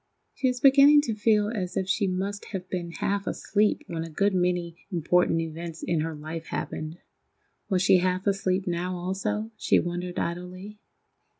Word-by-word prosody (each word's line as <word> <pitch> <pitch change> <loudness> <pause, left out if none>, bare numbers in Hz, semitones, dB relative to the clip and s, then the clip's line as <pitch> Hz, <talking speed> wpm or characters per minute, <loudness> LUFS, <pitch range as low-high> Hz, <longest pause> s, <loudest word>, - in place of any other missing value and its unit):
She 265 - 0
was 250 -1 0
beginning 280 +2 +7
to 240 -6 -2
feel 210 -1 +2
as 185 -6 -3
if 190 - 0
she 195 +1 +1
must 195 +2 -3
have 185 -2 -6
been 175 -2 -3
half 200 +4 -2
asleep 210 +1 +1
when 165 -1 -4
a 165 - -7
good 200 +5 +1
many 175 -2 0
important 175 0 +2
events 165 0 -6
in 170 -2 0
her 160 +1 -2
life 160 +2 -7
happened. 155 +2 -4 0.7
Was 185 -2 +2
she 190 -1 +6
half 185 +1 0
asleep 195 -1 +1
now 180 +1 -2
also, 205 +5 -2
she - - +3
wondered 175 +1 -4
idly? 185 +4 -5
185 Hz, 170 wpm, -27 LUFS, 170-205 Hz, 0.7 s, beginning